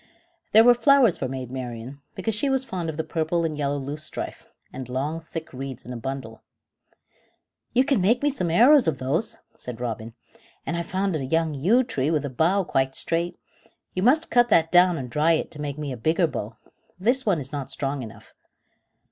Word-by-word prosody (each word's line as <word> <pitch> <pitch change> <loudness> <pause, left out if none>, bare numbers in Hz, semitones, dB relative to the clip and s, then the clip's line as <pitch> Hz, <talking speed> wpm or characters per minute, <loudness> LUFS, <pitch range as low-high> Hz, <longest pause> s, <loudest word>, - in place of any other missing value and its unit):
There 220 - +8
were 245 +1 +8
flowers 240 - +4
for 135 - -1
Maid 130 -1 -6
Marian, 130 +1 -6
because 205 +4 -2
she 275 +7 +1
was 265 -1 +1
fond 175 -8 -4
of 155 - -5
the 160 - -1
purple 165 +1 -1
and 155 -2 -2
yellow 145 -1 -1
loosestrife, 145 +3 -6 0.3
and 130 -1 -7
long 140 +6 -2
thick 165 -1 -8
reeds 130 -1 -7
in 125 - -6
a - - -5
bundle. 115 -2 -6 1.3
"You 255 +2 +4
can 270 -8 +2
make 235 +8 +2
me 290 - +3
some 210 -11 -2
arrows 250 - +6
of 155 -4 +1
those," 140 +12 -1 0.2
said 125 -2 -5
Robin; 115 -2 -5 0.5
"and 170 - -2
I've 170 0 -3
found 190 -1 -1
a 145 - -2
young 160 +3 0
yew 195 - +3
tree 150 - -1
with 155 -3 0
a 140 - -4
bough 175 +9 +2
quite 135 -5 0
straight. 170 +1 -1 0.6
You 185 - -2
must 285 +10 +3
cut 240 0 +4
that 165 -5 +4
down 180 -1 +5
and 130 - -5
dry 150 +6 +2
it 160 - -1
to 150 - -7
make 145 -1 -4
me 150 -2 -4
a 125 - -5
bigger 160 +8 +2
bow. 115 -8 -4 0.5
This 245 +7 +2
one 200 -7 +2
is 140 -2 -6
not 140 -3 -4
strong 135 0 -3
enough." 110 -3 -11
160 Hz, 205 wpm, -25 LUFS, 135-195 Hz, 1.3 s, There